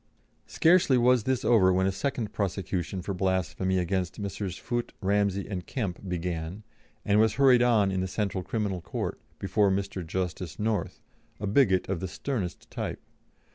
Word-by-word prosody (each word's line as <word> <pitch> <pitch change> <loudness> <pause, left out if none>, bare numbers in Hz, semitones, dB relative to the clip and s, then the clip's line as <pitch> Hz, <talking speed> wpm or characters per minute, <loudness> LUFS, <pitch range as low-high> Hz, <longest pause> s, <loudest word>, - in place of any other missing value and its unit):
Scarcely 165 -6 +4
was 125 -1 +4
this 130 -1 0
over 100 -6 +5
when 95 +1 +2
a 95 - +2
second 120 +1 -3
prosecution 95 -2 -2
for 100 - -3
blasphemy 95 0 0
against 90 0 -1
Messrs. 100 -2 -4
Foote, 120 +4 -3
Ramsey, 100 0 +1
and 95 -3 -5
Kemp 100 -6 -4
began, 85 +2 -3 0.4
and 105 +1 +3
was 110 0 +3
hurried 130 -3 +6
on 110 -5 +4
in 95 -1 -1
the 95 - -1
Central 95 -1 -2
Criminal 100 -5 -2
Court, - - -4 0.2
before 100 +1 +2
Mr. 95 -1 -2
Justice 90 0 -4
North, 110 0 -2 0.4
a 105 - -3
bigot 100 -3 +3
of 95 -2 -2
the 95 - -3
sternest 100 -4 -4
type. - - -4
100 Hz, 160 wpm, -28 LUFS, 95-110 Hz, 0.4 s, hurried